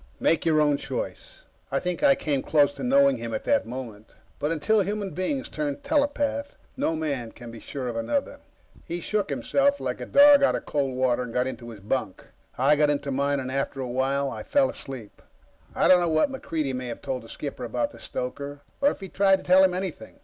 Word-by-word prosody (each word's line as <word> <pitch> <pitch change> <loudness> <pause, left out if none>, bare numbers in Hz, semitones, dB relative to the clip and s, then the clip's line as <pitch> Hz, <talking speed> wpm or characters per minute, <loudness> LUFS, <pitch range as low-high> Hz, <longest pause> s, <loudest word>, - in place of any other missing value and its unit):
Make 165 - +2
your 155 -1 +4
own 150 -1 +3
choice. - - -6 0.3
I - - +1
think 180 -1 -3
I 280 -2 +6
came 145 - -1
close 145 -1 +3
to - - -8
knowing 275 +2 +4
him, 115 -1 -4
at - - -4
that - - +1
moment, 115 -4 -8 0.2
but 150 - -1
until 205 +7 +2
human 200 0 -2
beings 265 +9 -2
turn 290 -2 -3
telepath, 285 -1 0 0.2
no 255 - 0
man 140 -7 -3
can 120 -1 -10
be 115 - -10
sure 130 +1 -6
of 120 - -3
another. 115 - -2 0.5
He 175 - -3
shook 205 +4 -1
himself 280 0 +1
like - - -3
a - - -5
dog 285 0 +7
out 275 - +4
of - - -5
cold 135 -3 -1
water, 125 -1 +1
and 125 -2 -5
got 125 +1 +1
into 125 -2 -6
his 110 -4 -10
bunk. 105 -2 -3 0.3
I 140 +4 +4
got 150 0 +3
into 140 -1 -1
mine, 140 +1 +1
and 130 -1 -4
after 140 0 -2
a 130 - -3
while 135 +2 0
I - - -6
fell 280 -2 +2
asleep. 125 -6 -9 0.5
I - - +3
don't 185 - +7
know 175 - +1
what 155 - +2
MacReidie 155 - -3
may 125 0 -4
have 120 - -7
told 130 -2 -3
the 115 - -14
skipper - - -6
about - - -2
the - - -14
stoker, 140 +3 -5 0.2
or 285 - +5
if - - -6
he 195 - -6
tried 195 +1 +3
to - - -12
tell 185 +1 +6
him 185 -1 +3
anything. 180 -12 -5
145 Hz, 220 wpm, -26 LUFS, 130-205 Hz, 0.5 s, dog